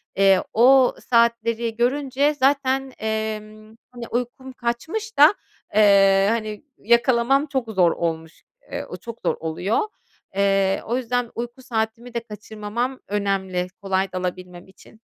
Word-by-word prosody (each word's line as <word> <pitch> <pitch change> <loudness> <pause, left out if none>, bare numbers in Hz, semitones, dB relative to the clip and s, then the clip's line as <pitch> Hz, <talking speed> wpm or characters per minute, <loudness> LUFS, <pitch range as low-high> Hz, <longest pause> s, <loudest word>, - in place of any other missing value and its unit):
eee, 195 -1 +4
o 255 +3 +5
saatleri 235 -1 +2
görünce 275 +4 +1
zaten, 270 -1 +1
emm, 215 0 -4 0.2
hani, 240 -2 -8
uykum 250 +2 -4
kaçmış 320 - -4
da, 300 +6 +8 0.4
eee, 195 -2 +5
hani, 215 -1 -3
yakalamam 235 +4 +3
çok 265 -5 -3
zor 180 -5 +3
olmuş. 160 -1 -4 0.3
Eee, - - -4
o - - -7
çok 230 -1 -10
zor - - +2
oluyor. 170 +7 -1 0.6
Eee, 195 -1 +2
o 235 +3 -1
yüzden 245 -1 -1
uyku 240 +2 -6
saatimi 230 0 -3
de 235 - -1
kaçırmamam 220 +3 -5
önemli, 195 -3 -1
kolay 195 0 -1
dalabilmem 180 -1 -5
için. 195 +3 -19
225 Hz, 125 wpm, -22 LUFS, 195-250 Hz, 0.6 s, da